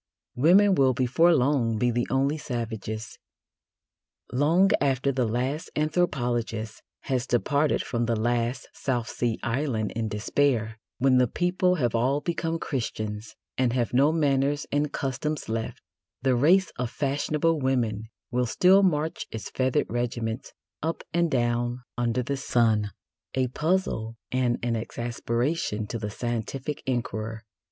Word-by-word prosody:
Women 190 +9 +5
will 135 -6 +3
before 135 +8 +4
long 125 -5 +2
be 120 +2 +2
the 120 +1 0
only 140 +3 +1
savages. 110 -4 -5 1.1
Long 160 +10 +3
after 135 -1 +2
the 125 -3 0
last 130 +7 -2
anthropologist 120 -9 -1 0.2
has 130 -2 -1
departed 145 +5 +1
from 120 -2 -1
the 115 - +1
last 120 +3 -1
South 120 -4 -2
Sea 115 -1 -1
Island 120 -3 -1
in 115 -1 -2
despair, 110 +1 0 0.2
when 130 0 +4
the 125 - +4
people 180 +6 +1
have 125 -9 0
all 130 +5 +2
become 165 +1 -2
Christians 110 -7 -4 0.2
and 125 -2 +2
have 125 -2 0
no 140 +4 +5
manners 145 -2 +1
and 145 +1 +1
customs 145 +3 -3
left, 110 0 -4 0.4
the 130 -2 +3
race 170 +8 +4
of 125 -1 -2
fashionable 150 +4 0
women 120 -6 0 0.3
will 125 0 +1
still 185 - +5
march 160 -4 0
its 110 - -6
feathered 130 -1 +1
regiments 120 0 -2 0.3
up 165 +2 -2
and 170 0 +2
down 120 -1 0
under 120 +1 0
the 140 +3 -2
sun, 115 -6 +2 0.5
a 130 -1 +1
puzzle 150 -8 -1
and 125 -2 +1
an 120 -1 0
exasperation 120 +1 -2
to 115 +2 -5
the 105 -1 -3
scientific 120 +6 -4
inquirer. 115 -3 -3
125 Hz, 135 wpm, -26 LUFS, 115-145 Hz, 1.1 s, Women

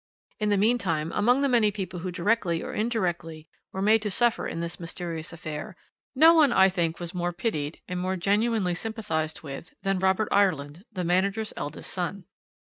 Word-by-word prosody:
"In 210 -1 +1
the 205 - +3
meantime, 190 -8 +1
among 245 +6 +3
the 280 - +3
many 235 -5 +4
people 190 -3 -5
who 185 +2 -4
directly 180 -1 0
or - - -6
indirectly 175 -8 -2 0.2
were 190 - -3
made 215 +2 +5
to 210 - -1
suffer 240 +4 +1
in - - -4
this 170 0 -4
mysterious 165 -1 -5
affair, 160 0 -6 0.4
no 320 +5 +8
one, 310 -5 +5
I 190 -4 +6
think, 170 -3 -1
was 175 0 -5
more 175 -1 -1
pitied, 170 -5 -3
and 180 0 -3
more 185 +1 -1
genuinely 205 0 +1
sympathised 180 -7 -3
with, 145 +3 -8
than 195 -1 +1
Robert 190 +3 +2
Ireland, 170 -3 +1
the 185 -4 -3
manager's 195 +5 0
eldest 145 - -5
son. 180 +1 -3
185 Hz, 180 wpm, -27 LUFS, 170-215 Hz, 0.4 s, no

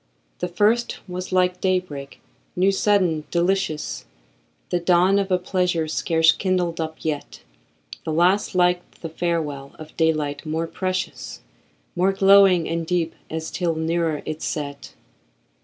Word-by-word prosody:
The 180 - -1
first 215 +6 +1
was 180 +1 -6
like 180 -1 +1
day 185 -1 +3
break, 140 -6 -10 0.3
new, 190 +2 +3
sudden, 190 -6 +2
delicious, 170 - -1 0.7
The 175 - +1
dawn 180 +3 +4
of 200 -1 -1
a 185 - +3
pleasure 180 -3 0
scarce 160 +1 +3
kindled 180 -3 -1
up 160 0 -4
yet; 150 -2 -4 0.6
The - - -3
last 185 +6 +2
like 180 0 +3 0.2
the 165 - -5
farewell 155 -5 -3
of 155 0 -11
daylight, 155 -3 0
more 160 +1 -2
precious, 185 +2 -4 0.5
More 185 +2 +2
glowing 195 -3 +5
and 165 0 -2
deep, 165 -1 -1 0.2
as 160 0 -4
'tis 170 -3 -1
nearer 160 -1 -1
its 155 +1 -5
set. 140 -2 -5
175 Hz, 140 wpm, -23 LUFS, 160-185 Hz, 0.7 s, glowing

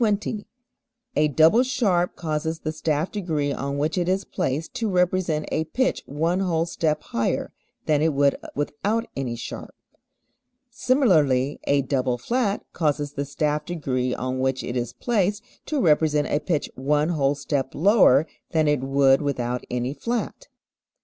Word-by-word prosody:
A 150 - +4
double 160 - +5
sharp 205 -9 +1
causes 160 0 -3
the 155 - -2
staff 155 +1 -1
degree 155 -8 -1
on 140 +1 -3
which 155 +5 0
it 175 0 0
is 190 +1 +1
placed 160 -3 -2
to 225 -2 -1
represent 180 -4 +1
a 160 - 0
pitch 255 +11 0
one 165 +6 0
whole 170 -4 +1
step 155 -3 -1
higher 115 0 -2 0.3
than 150 -1 +2
it 160 +1 +3
would 140 -1 +3 0.2
without 205 +10 -1
any 130 -3 -3
sharp. 115 - -8 1.0
Similarly, 160 - +2
a 140 -1 +3
double 130 -2 0
flat 210 - -1
causes 145 -3 -1
the 140 - -3
staff 150 +1 -1
degree 130 -7 -2
on 130 +1 -3
which 130 0 0
it 120 - -4
is 120 -1 -2
placed 210 -2 0 0.2
to 300 - -1
represent 150 - +3
a 145 - +1
pitch 155 -4 -2
one 150 +4 +1
whole 145 -4 +1
step 140 -1 -2
lower 160 - +5 0.3
than 155 -1 +3
it 150 -2 +2
would 135 +1 +3
without 125 -4 -2
any 125 +2 -2
flat. 240 - -4
150 Hz, 150 wpm, -24 LUFS, 140-180 Hz, 1.0 s, double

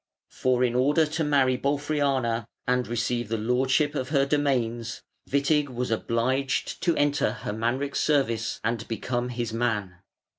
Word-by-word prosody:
For, 125 -1 +1
in 120 -1 +2
order 145 +6 +3
to 160 +2 -2
marry 135 -4 +2
Bolfriana 140 -5 0 0.2
and 125 0 +1
receive 120 -1 -1
the 115 - 0
lordship 130 +6 +1
of 130 -3 -3
her 140 -2 +3
domains, 125 -5 -1 0.3
Witig 140 +1 +2
was 125 -1 -3
obliged 130 +4 -1
to 170 -3 +2
enter 145 -6 +2
Hermanric's 120 +7 -1
service 120 -7 +1
and 115 -1 -2
become 120 +2 -2
his 120 -2 -3
man. 110 -6 -1
125 Hz, 140 wpm, -26 LUFS, 115-140 Hz, 0.3 s, order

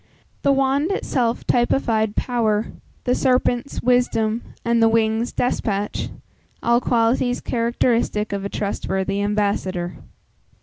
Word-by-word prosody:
The 280 - +3
wand 275 +3 +2
itself 245 -11 -1
typified 225 -3 +1
power; 225 -3 0 0.3
the 250 - +1
serpents, 255 0 +1
wisdom; 235 -2 +2 0.2
and 235 0 +2
the 225 - +6
wings, 225 +1 +1
despatch 210 -4 -1 0.5
all 235 +1 +3
qualities 245 +1 +1
characteristic 230 -3 0
of 200 -1 -3
a 200 - -3
trustworthy 195 -1 -2
ambassador. 200 -4 -1
230 Hz, 105 wpm, -22 LUFS, 210-245 Hz, 0.5 s, the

